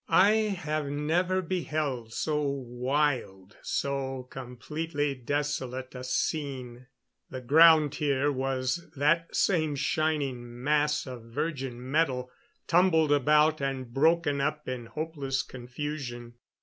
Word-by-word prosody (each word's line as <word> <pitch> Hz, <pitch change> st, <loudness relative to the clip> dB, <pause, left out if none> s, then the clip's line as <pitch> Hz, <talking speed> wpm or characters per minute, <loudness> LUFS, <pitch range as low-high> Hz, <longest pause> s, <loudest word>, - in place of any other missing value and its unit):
I 185 Hz, +5 st, +6 dB, 0.3 s
have 155 Hz, -2 st, -2 dB
never 170 Hz, +6 st, 0 dB
beheld 155 Hz, -9 st, -2 dB
so 150 Hz, +5 st, -1 dB
wild, 130 Hz, -6 st, -1 dB
so 135 Hz, -2 st, -2 dB
completely 145 Hz, +4 st, -3 dB
desolate 130 Hz, -1 st, -3 dB
a 125 Hz, -1 st, -7 dB
scene. 130 Hz, -2 st, -3 dB, 0.4 s
The 130 Hz, -, -6 dB
ground 155 Hz, +3 st, +6 dB
here 145 Hz, -1 st, +1 dB
was 135 Hz, +4 st, -2 dB
that 165 Hz, +4 st, +1 dB
same 155 Hz, -6 st, +2 dB
shining 135 Hz, -6 st, -1 dB
mass 150 Hz, +1 st, +2 dB
of 125 Hz, -4 st, -8 dB
virgin 130 Hz, -1 st, -4 dB
metal, 130 Hz, -5 st, +1 dB, 0.3 s
tumbled 165 Hz, -3 st, +4 dB
about 150 Hz, +2 st, +4 dB
and 130 Hz, -3 st, -3 dB
broken 150 Hz, 0 st, +3 dB
up 150 Hz, +1 st, -2 dB
in 125 Hz, -2 st, -4 dB
hopeless 145 Hz, -3 st, -3 dB
confusion. 125 Hz, -1 st, -6 dB
145 Hz, 110 wpm, -28 LUFS, 130-155 Hz, 0.4 s, I